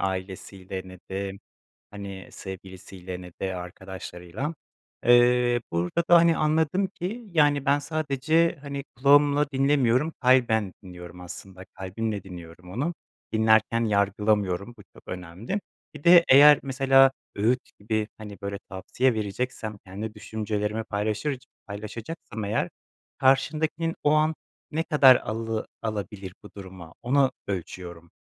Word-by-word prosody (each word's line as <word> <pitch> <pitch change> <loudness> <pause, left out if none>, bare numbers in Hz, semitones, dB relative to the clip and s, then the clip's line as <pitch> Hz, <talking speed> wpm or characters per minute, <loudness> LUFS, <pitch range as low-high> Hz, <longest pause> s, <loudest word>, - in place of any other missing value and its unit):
ailesiyle 95 0 -4
ne 95 0 -12
de, 95 0 -3 0.6
hani, 100 -2 -8
sevgilisiyle 95 -1 -9
ne 90 0 -10
de 95 -1 -2
arkadaşlarıyla. 90 - -6 0.5
Eee, 120 0 +5
burada 90 - 0
da, 175 - +8
hani, 170 -1 +4
anladım 160 +5 +1
ki, 200 +5 -6
yani, 145 -4 +3
ben 140 0 +3
sadece, 155 +2 +1
hani, 140 -1 -5
kulağımla 145 +2 +5
dinlemiyorum. 135 +1 +2
Kalben 120 -6 +3
dinliyorum 90 -1 -10
aslında. 95 +1 -10
Kalbimle 100 +2 -4
dinliyorum 90 -1 -11
onu. 145 - -2 0.4
Dinlerken 110 +1 +3
yargılamıyorum, 100 0 +1
bu - - -13
çok - - -16
önemli. 90 - -5 0.3
Bir 150 -1 -11
de 170 0 +8
eğer 145 +2 +9
mesela 135 0 +5 0.2
öğüt 115 +5 +2 0.2
gibi, 110 +1 -1
hani, 105 -2 -9
böyle, 100 0 -4
tavsiye 100 +7 0
vereceksem, 110 +1 -3
kendi 105 +4 -6
düşüncelerimi 105 0 -3
paylaşırc 110 +6 -2 0.2
paylaşacaksam 110 +3 -7
eğer, 105 +2 0 0.5
karşındakinin 155 +5 +1
o 150 - +4
an 155 +1 +3 0.4
ne 160 +2 0
kadar 145 -6 +7
alı 110 0 -3
alabilir 100 -3 -5
bu 105 - -11
duruma, 95 -4 -10
onu 135 +1 +3 0.2
ölçüyorum. 85 -3 -6
110 Hz, 120 wpm, -26 LUFS, 95-140 Hz, 0.6 s, eğer